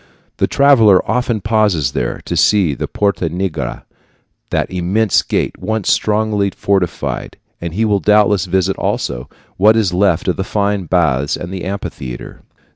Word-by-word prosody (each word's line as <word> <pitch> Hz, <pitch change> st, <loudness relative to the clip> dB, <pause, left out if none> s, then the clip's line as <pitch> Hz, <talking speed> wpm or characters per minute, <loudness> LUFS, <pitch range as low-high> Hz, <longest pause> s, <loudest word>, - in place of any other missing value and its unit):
The -, -, +1 dB
traveler 115 Hz, -9 st, +4 dB
often 120 Hz, -3 st, 0 dB
pauses 105 Hz, -, +1 dB
there -, -, -3 dB
to -, -, -3 dB
see 95 Hz, -8 st, +3 dB
the -, -, -4 dB
Porta 95 Hz, -5 st, -1 dB
Nigra, 80 Hz, -6 st, -4 dB, 0.7 s
that -, -, -1 dB
immense 95 Hz, +4 st, +1 dB
gate -, -, -2 dB
once 110 Hz, -3 st, -1 dB
strongly 105 Hz, -1 st, +1 dB
fortified, 95 Hz, -4 st, -2 dB, 0.2 s
and 85 Hz, -1 st, -5 dB
he 110 Hz, +3 st, +1 dB
will 105 Hz, -2 st, +2 dB
doubtless 105 Hz, -2 st, +3 dB
visit 95 Hz, +1 st, 0 dB
also 60 Hz, 0 st, -3 dB, 0.3 s
what 105 Hz, +4 st, +5 dB
is 100 Hz, -5 st, +1 dB
left 90 Hz, -2 st, +1 dB
of 90 Hz, -, 0 dB
the 95 Hz, -, -1 dB
fine 100 Hz, -1 st, -1 dB
baths 75 Hz, -5 st, +1 dB
and 85 Hz, +2 st, -7 dB
amphitheater. 90 Hz, -10 st, -6 dB
95 Hz, 145 wpm, -16 LUFS, 85-105 Hz, 0.7 s, what